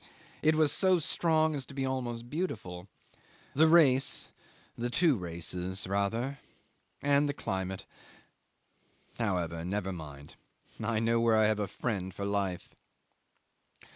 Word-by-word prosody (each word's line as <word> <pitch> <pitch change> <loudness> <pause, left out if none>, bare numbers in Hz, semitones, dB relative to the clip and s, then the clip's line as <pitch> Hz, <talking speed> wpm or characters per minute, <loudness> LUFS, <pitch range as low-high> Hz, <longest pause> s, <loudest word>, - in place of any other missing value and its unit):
It 155 0 +4
was 155 -2 +3
so 185 -2 +3
strong 160 -1 +2
as 140 -3 -3
to 140 - -11
be 135 -1 -1
almost 120 -3 -3
beautiful. 105 - -4 0.7
The 160 +3 +5
race 145 -6 +4 0.4
the 120 +1 -2
two 155 +4 +3
races 90 0 -3
rather 115 +8 -1 0.6
and 145 +1 +3
the 145 - -2
climate... 95 -4 -3 1.3
However, 85 -7 -1
never 95 +1 -2
mind. 75 -4 -10 0.5
I 115 0 0
know 115 +1 +2
where 115 -1 +4
I 110 - +5
have 105 0 +2
a 105 - -1
friend 95 -2 -3
for 100 +2 -5
life. 100 -3 -2
115 Hz, 130 wpm, -31 LUFS, 95-140 Hz, 1.3 s, The